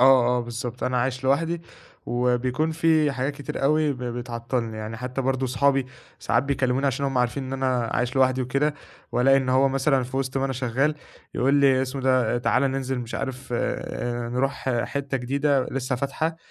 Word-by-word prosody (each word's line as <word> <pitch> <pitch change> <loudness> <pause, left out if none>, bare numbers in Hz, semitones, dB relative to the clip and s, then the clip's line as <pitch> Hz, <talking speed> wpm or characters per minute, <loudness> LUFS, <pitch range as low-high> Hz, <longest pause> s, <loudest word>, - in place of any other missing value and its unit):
آه، 130 -1 +6
آه، - - 0
بالضبط، 120 +1 -5
أنا 125 0 0
عايش 130 +1 -1
لوحدي، 165 +5 +1 0.4
وبيكون 125 +5 +1
في 160 -3 +3
حاجات 135 +2 -2
كتير 145 -1 -6
أوي 150 0 +3
ب 125 - -9
بتعطِّلني. 120 -1 -3
يعني 110 +1 -5
حتى 125 +2 -4
برضه، 130 0 0
أصحابي 135 +1 +2 0.3
ساعات 115 +5 +1
بيكلِّموني، 135 -1 0
عشان 135 +1 0
هُم 135 -2 0
عارفين 125 +3 0
إن 130 - -6
أنا 130 -3 0
عايش 125 +2 -1
لوحدي 130 0 +3
وكده، 140 +4 0 0.4
وألاقي 135 +2 +5
إن 130 -1 0
هو 135 +1 +4
مثلًا، 135 0 +2
في 130 +2 -6
وسط 135 0 -1
ما 135 - 0
أنا 135 - -1
شغَّال، 130 +4 0 0.4
يقول 135 +3 +2
لي 135 -2 +4
اسمه 135 +1 -3
إيه 130 - -7
ده: 125 -2 +3
"تعالَ، 125 +2 +2
ننزل، 135 -1 -1
مش 120 -1 -6
عارف 130 -1 -4
آآ، 120 0 -2
نروح 130 +3 0 0.2
ح 120 -2 +1
حتة 140 -1 -3
جديدة، 135 +1 +1
لسه 130 -1 -2
فاتحة." 155 +5 -2
130 Hz, 190 wpm, -25 LUFS, 125-140 Hz, 0.4 s, آه